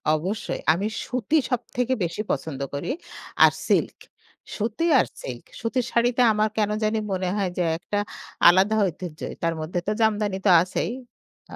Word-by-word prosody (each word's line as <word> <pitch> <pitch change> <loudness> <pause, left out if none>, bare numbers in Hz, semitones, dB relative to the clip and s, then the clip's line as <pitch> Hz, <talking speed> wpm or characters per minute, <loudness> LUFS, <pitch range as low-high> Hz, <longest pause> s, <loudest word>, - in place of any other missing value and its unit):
অবশ্যই। 190 +8 -3
আমি 195 +6 -1 0.2
সুতি 255 +5 0
সবথেকে 250 +1 -1
বেশি 170 +5 -3
পছন্দ 140 -4 -3
করি, 140 - -3 0.5
আর - - +8 0.2
সিল্ক। - - +1 0.6
সুতি 225 +9 -1
আর - - +3 0.2
সিল্ক। - - -7 0.2
সুতির 240 +1 -1
শাড়িতে 240 +1 +2
আমার 215 +1 +1
কেনো 210 -1 +1
জানি 215 +1 +1
মনে 185 -1 -1
হয় 195 -3 0
যে 180 - +2 0.2
একটা 205 +3 -2 0.5
আলাদা 190 +5 +4
ঐতিহ্যই 175 -2 -5
তার 165 0 +1
মধ্যে 170 +3 -2
তো - - +2
জামদানি 210 -3 +1
তো - - +5
আছেই। 185 +4 -2 0.6
আ - - -6
210 Hz, 155 wpm, -24 LUFS, 180-225 Hz, 0.6 s, আর